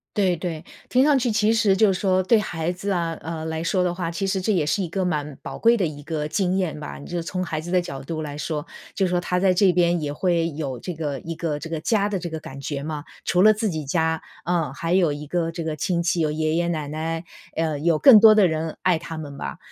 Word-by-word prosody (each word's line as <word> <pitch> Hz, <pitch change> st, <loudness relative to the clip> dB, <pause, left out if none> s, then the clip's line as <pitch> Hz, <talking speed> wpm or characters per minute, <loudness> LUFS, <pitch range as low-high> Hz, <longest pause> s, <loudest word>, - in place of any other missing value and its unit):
对 190 Hz, -4 st, +2 dB
对。 165 Hz, -1 st, -5 dB, 0.2 s
听 255 Hz, +2 st, +4 dB
上 290 Hz, -2 st, +5 dB
去 250 Hz, -2 st, +1 dB
其 215 Hz, +1 st, +3 dB
实 210 Hz, -4 st, +3 dB
就 205 Hz, -1 st, +4 dB
是 185 Hz, -, -4 dB
说 185 Hz, -2 st, +3 dB
对 220 Hz, +5 st, +4 dB
孩 170 Hz, -5 st, -2 dB
子 190 Hz, +3 st, -3 dB
啊， 170 Hz, -3 st, -1 dB
呃， 160 Hz, 0 st, -5 dB
来 160 Hz, 0 st, -3 dB
说 185 Hz, +2 st, +1 dB
的 180 Hz, -1 st, 0 dB
话， 170 Hz, -2 st, -3 dB
其 180 Hz, +4 st, -2 dB
实 190 Hz, 0 st, 0 dB
这 215 Hz, +4 st, 0 dB
也 170 Hz, -6 st, +2 dB
是 190 Hz, +6 st, 0 dB
一 175 Hz, -, -4 dB
个 185 Hz, +1 st, -1 dB
蛮 150 Hz, -5 st, -2 dB
宝 -, -, -7 dB
贵 230 Hz, +1 st, +4 dB
的 190 Hz, -, +1 dB
一 145 Hz, -2 st, -6 dB
个 155 Hz, -1 st, -3 dB
经 185 Hz, +3 st, 0 dB
验 180 Hz, -5 st, -1 dB
吧。 150 Hz, -, -7 dB
你 -, -, -10 dB
就 175 Hz, -1 st, -3 dB
从 180 Hz, +2 st, -4 dB
孩 155 Hz, -2 st, -3 dB
子 175 Hz, +3 st, -7 dB
的 180 Hz, -, +3 dB
角 135 Hz, -6 st, -7 dB
度 155 Hz, +2 st, -4 dB
来 145 Hz, -2 st, -5 dB
说， 150 Hz, -1 st, -3 dB, 0.3 s
就 195 Hz, -, +1 dB
是 -, -, 0 dB
说 175 Hz, 0 st, +1 dB
他 180 Hz, +1 st, 0 dB
在 185 Hz, 0 st, +3 dB
这 185 Hz, +1 st, +4 dB
边 175 Hz, -1 st, +2 dB
也 145 Hz, -1 st, -2 dB
会 170 Hz, +1 st, +1 dB
有 145 Hz, -4 st, -4 dB
这 180 Hz, -, -5 dB
个 150 Hz, -4 st, -3 dB
一 165 Hz, -, -5 dB
个 155 Hz, -3 st, -2 dB
这 165 Hz, -, -7 dB
个 165 Hz, -1 st, -3 dB
家 205 Hz, +4 st, +1 dB
的 195 Hz, -, -2 dB
这 170 Hz, -, -5 dB
个 160 Hz, -1 st, -5 dB
感 140 Hz, -1 st, -9 dB
觉 140 Hz, 0 st, -4 dB
嘛。 150 Hz, 0 st, -5 dB, 0.2 s
除 180 Hz, -, +2 dB
了 215 Hz, +2 st, +7 dB
自 215 Hz, 0 st, -1 dB
己 155 Hz, -4 st, -4 dB
家， 160 Hz, +2 st, 0 dB, 0.2 s
嗯， 165 Hz, -5 st, 0 dB
还 165 Hz, +4 st, -2 dB
有 175 Hz, -5 st, +3 dB
一 145 Hz, +1 st, -7 dB
个 170 Hz, 0 st, -1 dB
这 165 Hz, 0 st, -5 dB
个 155 Hz, -1 st, -3 dB
亲 175 Hz, -1 st, 0 dB
戚， 175 Hz, 0 st, +1 dB
有 155 Hz, -2 st, +2 dB
爷 155 Hz, +1 st, 0 dB
爷 170 Hz, 0 st, +1 dB
奶 155 Hz, -4 st, -2 dB
奶， 160 Hz, +2 st, -3 dB, 0.3 s
嗯， 155 Hz, -3 st, -1 dB
有 170 Hz, -2 st, +4 dB
更 240 Hz, -, +9 dB
多 220 Hz, 0 st, +8 dB
的 205 Hz, -3 st, +6 dB
人 160 Hz, -1 st, -2 dB
爱 180 Hz, -3 st, +2 dB
他 165 Hz, 0 st, -7 dB
们 145 Hz, -3 st, -7 dB
吧。 -, -, -5 dB
170 Hz, 295 characters per minute, -23 LUFS, 155-185 Hz, 0.3 s, 更